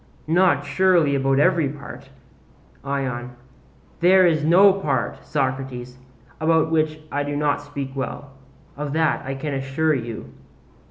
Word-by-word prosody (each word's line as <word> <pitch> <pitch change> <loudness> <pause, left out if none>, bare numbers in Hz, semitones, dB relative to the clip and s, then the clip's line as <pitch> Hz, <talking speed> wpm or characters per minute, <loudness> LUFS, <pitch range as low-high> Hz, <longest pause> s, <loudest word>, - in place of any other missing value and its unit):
not 170 -6 +3
surely 175 -6 +3
about 135 0 +1
every 165 -1 +3
part. 140 0 -10 0.7
ION: 130 -3 -3 0.6
There 185 +2 +5
is 160 -3 +2
no 185 +5 +6
part, 145 -10 -2
Socrates, 130 -3 -3 0.4
about 160 0 +2
which 155 -1 0
I 145 - -1
do 145 0 -3
not 145 -1 0
speak 140 -2 -7
well: 135 +1 -5 0.4
of 145 0 -4
that 160 -2 +1
I 135 0 -4
can 140 +2 -4
assure 135 +4 0
you. 115 -5 -5
145 Hz, 130 wpm, -22 LUFS, 135-160 Hz, 0.7 s, no